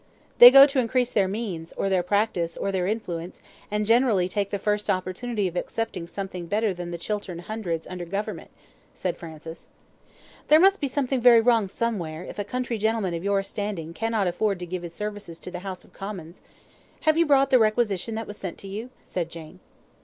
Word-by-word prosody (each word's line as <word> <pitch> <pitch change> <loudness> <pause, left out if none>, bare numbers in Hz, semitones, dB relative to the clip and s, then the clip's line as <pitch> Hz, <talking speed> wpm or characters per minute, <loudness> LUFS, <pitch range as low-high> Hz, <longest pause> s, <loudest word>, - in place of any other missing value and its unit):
"They 245 - +13
go 275 +2 +10
to 275 -1 0
increase 250 0 +1
their 200 -3 +2
means, 190 -6 -5
or - - -2
their 190 -2 +2
practice, 180 -3 0
or 200 - -1
their 185 -2 -1
influence, 180 -5 -4 0.3
and 210 0 -1
generally 225 -5 +3
take 200 +1 -2
the 200 - -2
first 210 +1 -1
opportunity 190 +3 -1
of 175 - -7
accepting 185 -2 -3
something 185 -1 -6
better 210 +2 +1
than 175 -1 -6
the 170 - -4
Chiltern 195 0 -4
Hundreds 175 -3 -4
under 180 -1 -6
Government," 200 +4 -4 0.5
said 180 -2 -2
Francis. 160 0 -10 0.8
"There 310 - +7
must 390 +3 +5
be 285 - +1
something 265 -1 -1
very 235 -1 +8
wrong 225 -4 +3
somewhere, 180 -8 -3
if 190 - -9
a - - 0
country 240 +1 -3
gentleman 220 -4 0
of 170 +1 -4
your 200 0 +1
standing 195 -6 -5
cannot 225 +1 0
afford 195 +3 0
to 180 - -6
give 180 +1 -4
his 170 -1 -8
services 205 -5 -6
to 180 - -9
the 180 - -5
House 185 -1 -7
of - - -22
Commons. 190 -4 -8 0.6
Have 310 0 +3
you 335 0 +3
brought 275 -1 +4
the 255 - +6
requisition 215 -1 +1
that 225 0 -3
was 205 0 -9
sent 185 -3 -6
to 195 - -10
you?" 215 +5 -6 0.2
said 170 -2 -3
Jane. 160 -2 -11
200 Hz, 200 wpm, -25 LUFS, 180-225 Hz, 0.8 s, They